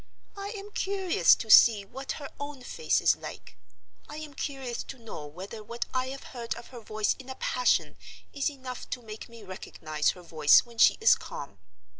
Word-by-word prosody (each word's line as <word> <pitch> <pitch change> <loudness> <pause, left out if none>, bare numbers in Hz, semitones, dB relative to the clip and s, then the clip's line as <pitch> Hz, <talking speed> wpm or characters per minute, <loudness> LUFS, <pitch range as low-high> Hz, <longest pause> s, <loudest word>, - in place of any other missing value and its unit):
I 400 0 -5
am 405 +1 -9
curious 380 - +3
to 220 - -3
see 215 -4 +8
what 265 +6 -5
her 285 -2 -8
own 285 -2 -6
face 155 -9 0
is - - +5
like. 90 - -10 0.5
I - - -7
am 310 -2 -8
curious 270 -4 -4
to 270 - -8
know 220 -11 -8
whether 190 +8 -8
what 235 +2 -4
I 255 0 0
have 270 +1 -7
heard 235 -2 -4
of 235 - -11
her 245 - -9
voice 215 -1 0
in 265 0 -11
a 260 - -5
passion 250 -1 +1 0.4
is 280 0 0
enough 260 -3 -8
to 250 - -4
make 215 +1 -9
me 230 -2 -12
recognize 155 -5 -2
her 180 - -12
voice 155 -3 +5
when 235 -1 -14
she - - +7
is 445 - +7
calm. 100 -9 -6
240 Hz, 195 wpm, -29 LUFS, 205-275 Hz, 0.5 s, see